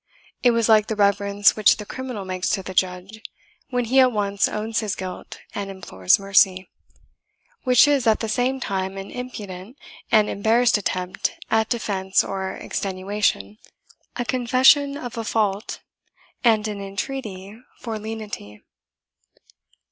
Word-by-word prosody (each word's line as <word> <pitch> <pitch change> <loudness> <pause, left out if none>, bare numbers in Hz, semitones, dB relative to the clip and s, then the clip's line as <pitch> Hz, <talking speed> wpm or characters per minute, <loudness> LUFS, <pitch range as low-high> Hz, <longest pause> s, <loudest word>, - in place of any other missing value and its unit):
It 245 - +5
was 230 -2 +2
like 215 -1 +5
the 220 - -2
reverence 200 0 +3
which 215 -1 +4
the 210 - -7
criminal 250 -4 -6
makes 185 -1 -2
to 195 - -1
the 185 - -7
judge, 185 +4 -2 0.5
when 245 -1 -1
he 260 +4 +3
at 255 -1 +6
once 200 -2 0
owns 220 +1 -2
his 210 -4 -2
guilt 185 -1 -7 0.2
and 200 -1 -4
implores 95 - +1
mercy 195 -1 +2 0.9
which 250 +2 +6
is 280 -5 +2
at 220 - +4
the 225 - -3
same 250 +4 0
time 195 -4 -3
an 195 0 -7
impudent 215 -3 -8 0.3
and 215 -2 +5
embarrassed 230 +4 +2
attempt 185 -2 -2 0.2
at 220 -1 +2
defence 195 -5 0
or 190 -1 -4
extenuation, 190 - -2 0.6
a 245 - -2
confession 260 +4 +3
of 245 -4 -6
a - - -3
fault, 210 -2 -1 0.6
and 220 -3 +3
an 205 -2 -5
entreaty 200 -1 -6 0.2
for 225 -3 -5
lenity. 210 - -7
210 Hz, 140 wpm, -23 LUFS, 195-235 Hz, 0.9 s, at